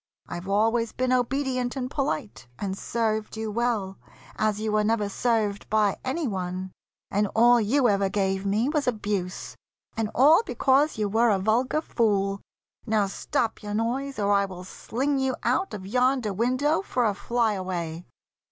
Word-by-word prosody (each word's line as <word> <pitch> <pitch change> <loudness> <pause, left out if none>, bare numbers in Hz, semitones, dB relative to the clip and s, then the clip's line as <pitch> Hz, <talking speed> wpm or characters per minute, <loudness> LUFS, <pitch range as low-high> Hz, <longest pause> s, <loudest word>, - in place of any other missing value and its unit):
I've 175 +2 -6
always 225 +3 +1
been 255 0 0
Obedient 255 0 0
and 255 -2 -2
polite, 265 - -3
and 190 +3 -3
served 220 0 -2
you 220 -1 -3
well, 215 -4 -1 0.4
As 215 -1 0
you 215 0 -2
were 210 0 +2
never 215 -1 +1
served 215 -2 -1
by 210 -2 +2
any 275 +4 -1
one, 185 -2 -4 0.4
And 205 +1 +1
all 240 +1 +6
you 250 +5 +3
ever 200 -2 +2
gave 190 -1 0
me 205 +5 +1
was 295 -2 0
abuse, 205 -5 -2 0.4
And 220 -1 -1
all 300 - +6
because 285 - +2
you 210 -1 0
were 225 +3 +3
a 205 - +3
vulgar 235 +9 +1
fool. 200 -7 0 0.5
Now 215 -2 +2
stop 225 +4 -2
your 205 -1 -4
noise, 265 +5 -2
or 205 -1 +1
I 200 0 +3
will 185 -2 -8
sling 270 +9 -2
you 265 -1 0
out 255 - +1
Of 190 -3 -7
yonder 250 0 +1
window 255 - +1
for 250 -11 -1
a 210 - +2
fly 230 +2 0
away!" 175 -3 -4
220 Hz, 165 wpm, -26 LUFS, 200-250 Hz, 0.5 s, all